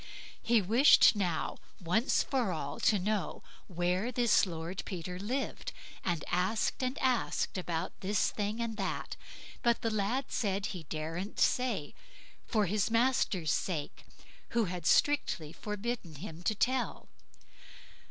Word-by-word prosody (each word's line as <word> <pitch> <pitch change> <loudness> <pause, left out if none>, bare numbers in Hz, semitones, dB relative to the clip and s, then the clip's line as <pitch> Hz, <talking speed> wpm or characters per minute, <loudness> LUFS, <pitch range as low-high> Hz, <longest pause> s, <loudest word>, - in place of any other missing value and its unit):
He 230 -3 +3
wished 230 +4 +7
now, 180 -6 -1 0.2
once 205 - +2
for 250 -8 0
all, 150 -4 -4
to 210 - +4
know 205 +1 -2 0.2
where 180 +6 0
this 235 -4 +3
Lord 170 +2 -4
Peter 180 -1 -5
lived, 265 - -3 0.3
and 175 -4 -1
asked 185 +9 +1
and 255 +1 -1
asked 255 -3 0
about 175 -3 -2
this 195 +1 +1
thing 210 +2 -2
and 230 -2 -2
that, 195 -2 -3 0.5
but 235 +1 +2
the 225 - +1
lad 215 +6 0
said 200 -3 0
he 180 -7 -5
daren't 165 +5 -4
say, 235 - +1 0.5
for 215 -3 +2
his 205 +3 +1
master's 225 - +2
sake, 160 -6 -2 0.5
who 230 - +4
had 175 -2 -4
strictly 180 - +2
forbidden 210 -5 -4
him 160 +1 -8
to 215 - +2
tell. 255 +4 0
200 Hz, 135 wpm, -32 LUFS, 175-235 Hz, 0.5 s, wished